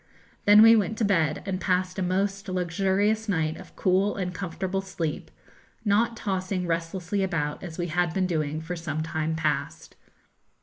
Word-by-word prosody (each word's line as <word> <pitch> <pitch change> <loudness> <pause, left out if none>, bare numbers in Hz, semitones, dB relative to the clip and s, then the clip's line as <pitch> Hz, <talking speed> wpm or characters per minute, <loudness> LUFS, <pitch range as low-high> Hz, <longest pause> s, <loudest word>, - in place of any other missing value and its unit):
Then 210 +1 +8
we 225 0 +9
went 215 0 0
to 220 - +1
bed, 165 -7 +1
and 185 -2 -3
passed 185 0 0
a - - -1
most 195 +2 -1
luxurious 195 +4 0
night 160 -4 0
of 190 - -13
cool 190 +2 +2
and 180 -2 -3
comfortable 190 +1 -3
sleep, 170 -5 -4 0.6
not 225 +3 +2
tossing 185 -2 -2
restlessly 175 +3 -2
about, 165 -6 -1
as 170 -3 -8
we 175 - -1
had 175 0 0
been 185 +2 0
doing 155 -3 -1
for 170 +3 -5
some 155 -2 -3
time 160 0 -2
past. 155 0 -2
185 Hz, 165 wpm, -26 LUFS, 165-195 Hz, 0.6 s, we